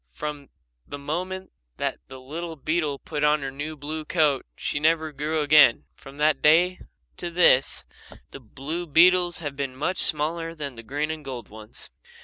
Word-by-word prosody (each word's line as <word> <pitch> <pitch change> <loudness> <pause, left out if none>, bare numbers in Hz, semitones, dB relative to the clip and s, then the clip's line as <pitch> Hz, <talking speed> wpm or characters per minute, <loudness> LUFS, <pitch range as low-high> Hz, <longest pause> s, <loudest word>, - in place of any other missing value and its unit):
From 145 - -6 0.4
the 145 - -6
moment 180 +6 -4 0.3
that - - -2
the 130 0 -10
little 160 +6 -6
beetle 155 -1 -1
put 150 +1 -4
on 150 -1 +3
her 135 - -3
new 145 +3 -5
blue 155 +2 -5
coat 150 -4 +1
she 145 - -2
never 160 0 +2
grew 150 +2 -1
again. 145 -4 +6
From 135 +1 -14
that 150 -2 +2
day 175 +4 +4 0.4
to 175 - -4
this 170 -6 +3 0.5
the - - -9
blue 140 +8 -5
beetles 175 +3 +5
have 145 -1 -4
been 135 -2 -4
much 170 +7 -2
smaller 165 +2 -1
than 145 -4 -5
the 115 - -10
green 145 +7 -2
and 155 -1 -6
gold 125 -5 -7
ones. 110 0 -10
150 Hz, 170 wpm, -25 LUFS, 140-165 Hz, 0.5 s, again